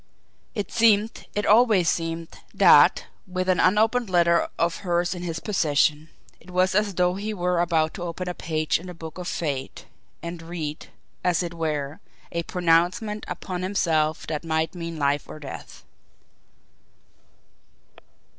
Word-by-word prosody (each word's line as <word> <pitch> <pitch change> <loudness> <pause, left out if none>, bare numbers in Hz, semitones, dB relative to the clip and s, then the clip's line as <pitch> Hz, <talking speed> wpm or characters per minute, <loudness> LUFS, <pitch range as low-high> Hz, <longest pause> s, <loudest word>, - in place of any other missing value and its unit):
It 205 -3 -3
seemed, 220 -1 +2
it 210 - 0
always 215 -5 +5
seemed, 165 0 -1 0.3
that, - - +6 0.2
with 185 0 -3
an 185 -1 +2
unopened 220 +4 +3
letter 170 -1 +3
of 170 +1 0
hers 175 -1 0
in 180 - -7
his 165 -2 -4
possession, 155 -5 +1 0.3
it - - -18
was 185 +1 +2
as 205 -1 +1
though 180 0 +2
he 210 +3 -4
were 180 -2 +1
about 160 -2 +1
to - - -8
open 175 +1 -4
a 180 - -2
page 155 -2 -1
in 180 - -10
the 180 - -8
Book 160 +1 -9
of 180 - -5
Fate 140 -5 -4 0.4
and 170 0 -6
read, 165 -3 -6 0.4
as 180 0 +2
it 170 -1 -5
were, 155 -3 -3 0.3
a 170 - -1
pronouncement 180 +6 +1
upon 180 -2 -5
himself 160 -5 0
that 155 0 -4
might 160 +1 -1
mean 170 -2 -6
life 145 -1 0
or - - -8
death. 145 -3 -9
175 Hz, 150 wpm, -24 LUFS, 160-185 Hz, 0.4 s, that